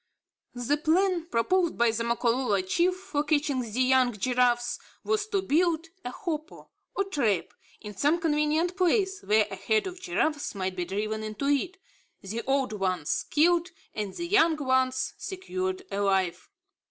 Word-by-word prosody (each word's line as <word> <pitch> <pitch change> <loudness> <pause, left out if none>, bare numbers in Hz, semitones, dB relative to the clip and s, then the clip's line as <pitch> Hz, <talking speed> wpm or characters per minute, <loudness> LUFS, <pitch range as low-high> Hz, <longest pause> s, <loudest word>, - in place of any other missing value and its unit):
The 245 +4 0
plan 340 +2 +1
proposed 345 +7 +1
by 235 -1 +4
the 230 +1 -2
Makololo 235 -2 +1
chief 345 - +1
for 310 -6 -3
catching 290 -2 +1
the 235 +1 -2
young 255 -1 +4
giraffes, 240 +2 +1 0.2
was 430 0 0
to 395 -3 -1
build 335 -1 +1
a 245 - -4
hopo 310 +2 -6 0.2
or 395 - +1
trap, 240 - 0 0.3
in 210 -1 -8
some 295 - +2
convenient 315 +2 +1
place 385 +1 +1
where 215 0 +3
a - - -4
herd 435 -2 +1
of 365 -1 -7
giraffes 310 - -1
might 190 -1 -2
be 180 -1 -2
driven 215 +3 -3
into 215 +4 -4
it, 340 +7 0 0.4
the 215 +4 -5
old 270 -4 +1
ones 185 -6 -1
killed 340 +3 +3 0.2
and 210 -3 -4
the 345 - -4
young 340 -4 +4
ones 260 -2 +1
secured 375 0 -4
alive. 190 -3 0
285 Hz, 155 wpm, -27 LUFS, 225-350 Hz, 0.4 s, by